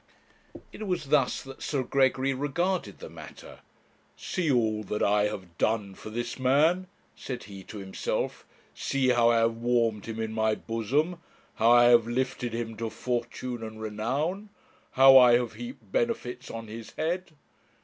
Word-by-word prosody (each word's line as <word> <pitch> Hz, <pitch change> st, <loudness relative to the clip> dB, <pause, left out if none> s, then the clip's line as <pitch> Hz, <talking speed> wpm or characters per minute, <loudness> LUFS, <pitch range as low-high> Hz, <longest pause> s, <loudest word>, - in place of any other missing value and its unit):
It 215 Hz, -, -7 dB
was 175 Hz, -6 st, -2 dB
thus 140 Hz, -4 st, +2 dB
that 135 Hz, 0 st, -11 dB
Sir 140 Hz, -3 st, -1 dB
Gregory 135 Hz, +1 st, +2 dB
regarded 170 Hz, +8 st, -1 dB
the -, -, -9 dB
matter. -, -, -12 dB, 0.6 s
'See 175 Hz, -4 st, -2 dB
all 110 Hz, -4 st, +1 dB
that 105 Hz, -, -2 dB
I 105 Hz, 0 st, +3 dB
have 95 Hz, -5 st, -8 dB
done 105 Hz, -3 st, 0 dB
for 110 Hz, -, -10 dB
this 120 Hz, +3 st, -4 dB
man,' 155 Hz, +8 st, +3 dB, 0.3 s
said 125 Hz, -2 st, -6 dB
he 100 Hz, -1 st, -10 dB
to 110 Hz, -, -9 dB
himself; 95 Hz, -1 st, -3 dB, 0.3 s
'see 135 Hz, -2 st, 0 dB
how 120 Hz, -1 st, +4 dB
I 120 Hz, -, +4 dB
have 115 Hz, 0 st, +2 dB
warmed 115 Hz, -3 st, 0 dB
him 115 Hz, 0 st, -5 dB
in 110 Hz, 0 st, -3 dB
my 110 Hz, -1 st, +1 dB
bosom, 135 Hz, -, -1 dB, 0.4 s
how 115 Hz, -, +4 dB
I 120 Hz, 0 st, +7 dB
have 120 Hz, -1 st, +6 dB
lifted 125 Hz, 0 st, -2 dB
him 115 Hz, -1 st, -4 dB
to 115 Hz, 0 st, -3 dB
fortune 120 Hz, +1 st, -4 dB
and 110 Hz, -1 st, -7 dB
renown, 135 Hz, -, -2 dB, 0.4 s
how 135 Hz, 0 st, +9 dB
I 125 Hz, -1 st, +7 dB
have 120 Hz, -1 st, +2 dB
heaped 245 Hz, +2 st, -9 dB
benefits 125 Hz, -, -2 dB
on 115 Hz, 0 st, -6 dB
his 110 Hz, +1 st, -9 dB
head! 170 Hz, +2 st, -2 dB
120 Hz, 160 wpm, -28 LUFS, 110-135 Hz, 0.6 s, how